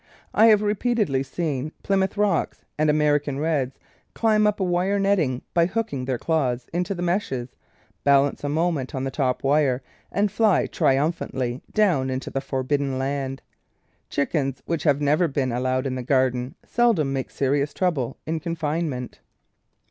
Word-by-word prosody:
I 220 +2 +6
have 215 -2 +5
repeatedly 210 - +1
seen 150 0 -3
Plymouth 195 0 +1
Rocks 210 -1 0
and 155 0 +2
American 150 -2 +2
Reds 145 -4 -1 0.4
climb 215 -2 +3
up 210 0 0
a - - +1
wire 180 +2 +1
netting 185 -11 +1
by 170 -1 +4
hooking 185 - -2
their 130 -1 -1
claws 130 -5 0
into 180 +3 -1
the 175 - -4
meshes, 170 - -1 0.5
balance 140 0 +3
a 145 - -1
moment 155 -4 -1
on 130 - -2
the 135 - -2
top 130 -2 -1
wire, 135 -2 +2 0.3
and 200 0 +1
fly 215 -2 +3
triumphantly 135 -4 0
down 175 -12 +2
into 130 0 -4
the 135 - -2
for 135 -2 -3
bidden 140 0 0
land. 135 0 -3 0.7
Chickens 135 -2 -1
which 165 -1 -2
have 145 -1 +3
never 150 +4 +3
been 135 -3 -1
al 120 +1 -1
lowed 130 +1 0
in 135 - -1
the 130 - -3
garden 125 -1 +1
seldom 215 - +2
make 135 -1 -3
serious 140 +1 0
trouble 145 -10 -1
in 160 +1 -2
confinement. 155 -5 -3
145 Hz, 160 wpm, -24 LUFS, 130-175 Hz, 0.7 s, I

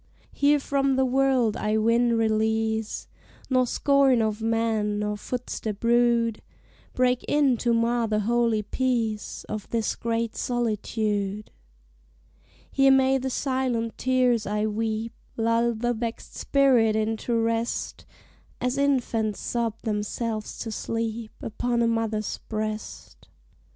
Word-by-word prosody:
Here 290 +1 +4
from 275 -1 +1
the 265 0 +3
world 255 -4 +2
I 215 +1 0
win 230 +2 +3
release, 220 0 0 0.4
Nor 255 -1 +3
scorn 275 -2 +3
of 220 -1 -1
men, 225 -2 0
nor 210 0 -1
footstep 220 -2 -5
rude, 235 -1 +2 0.5
Break 250 0 +2
in 285 -4 +3
to 240 +1 0
mar 230 0 +2
the 215 -1 0
holy 230 0 +1
peace 225 -2 -2
Of 215 -2 -5
this 230 -2 -1
great 230 -1 -2
solitude. 215 -3 -2 1.2
Here 270 0 +4
may 265 0 +4
the 265 +1 -2
silent 255 -4 -1
tears 250 -4 +2
I 210 +1 0
weep 220 +1 -2 0.2
Lull 230 +1 +2
the 240 +2 0
vexed 230 0 -5
spirit 250 -6 +3
into 220 +2 -1
rest, 230 +1 -2 0.5
As 250 +2 -1
infants 240 -7 0
sob 230 -2 -2
themselves 215 0 -3
to 225 - -4
sleep 225 0 -3
Upon 235 +2 -1
a - - +3
mother's 225 -2 -1
breast. 215 0 -5
230 Hz, 120 wpm, -25 LUFS, 220-245 Hz, 1.2 s, Here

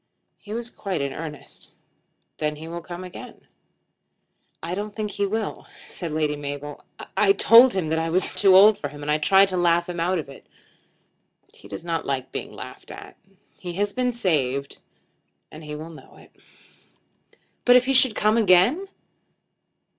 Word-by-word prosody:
"He 210 - -13
was 235 +2 -5
quite 195 -3 -4
in 140 -1 -3
earnest." 155 -1 -10 0.6
"Then 150 -1 -1
he 155 +2 -10
will 170 +1 -6
come 175 +2 -8
again." 180 - -11 1.2
"I 170 +2 -4
don't 205 +2 -5
think 210 -1 -4
he 200 0 -1
will," 215 0 -4 0.2
said 170 -3 -6
Lady 150 -1 -1
Mabel. 145 0 -7 0.3
"I 200 -2 +4
told 235 +5 +7
him 175 -5 -1
that 160 0 0
I 165 0 -2
was 185 +3 0
too 195 -2 +4
old 205 +2 +7
for 145 - -3
him, 145 0 -11
and 150 - -1
I 150 - +1
tried 195 +5 +5
to 185 - -2
laugh 175 -1 +2
him 175 -1 -5
out 180 +2 0
of 155 - -5
it. 135 - -14 1.1
He - - -16
does 100 +11 -8
not 165 -1 -3
like 130 -2 -3
being - - -6
laughed - - -11
at. - - -11 0.4
He 175 -2 -6
has 200 +3 -2
been 250 -1 0
saved, 140 - -1 0.7
and 155 +1 -11
he 150 0 -7
will 160 +2 -8
know 155 - -15
it." - - -18 1.3
"But 245 - +6
if 250 0 +5
he 270 - +1
should 255 -4 +4
come 215 +2 +2
again?" 220 - +3
175 Hz, 175 wpm, -23 LUFS, 150-205 Hz, 1.3 s, told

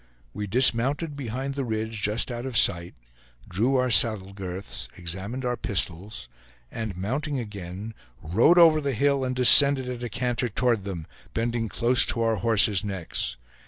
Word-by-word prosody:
We 105 - -5
dismounted 130 - +3
behind 135 +1 -5
the 140 0 -4
ridge 110 -2 -4
just 105 +5 -1
out 120 +2 -5
of 125 -3 -3
sight, 85 -5 +1 0.5
drew 115 +9 -1
our 125 -1 +1
saddle 105 -4 +2
girths, 95 0 -7
examined 95 +9 -6
our 125 0 -1
pistols, 95 - -4 0.4
and 110 -5 -6
mounting 135 +9 -3
again 100 -1 -8 0.3
rode 110 - +2
over 160 -3 +6
the 140 -2 -2
hill, 140 +2 +1
and 130 0 -3
descended 130 +1 +7
at 125 -1 -6
a 120 - -5
canter 125 +1 -2
toward 115 -2 0
them, 90 -5 -6 0.3
bending 115 0 -2
close 120 +4 +2
to 115 - -1
our 115 -1 0
horses' 105 -1 +2
necks. 90 - -3
115 Hz, 160 wpm, -24 LUFS, 100-130 Hz, 0.5 s, descended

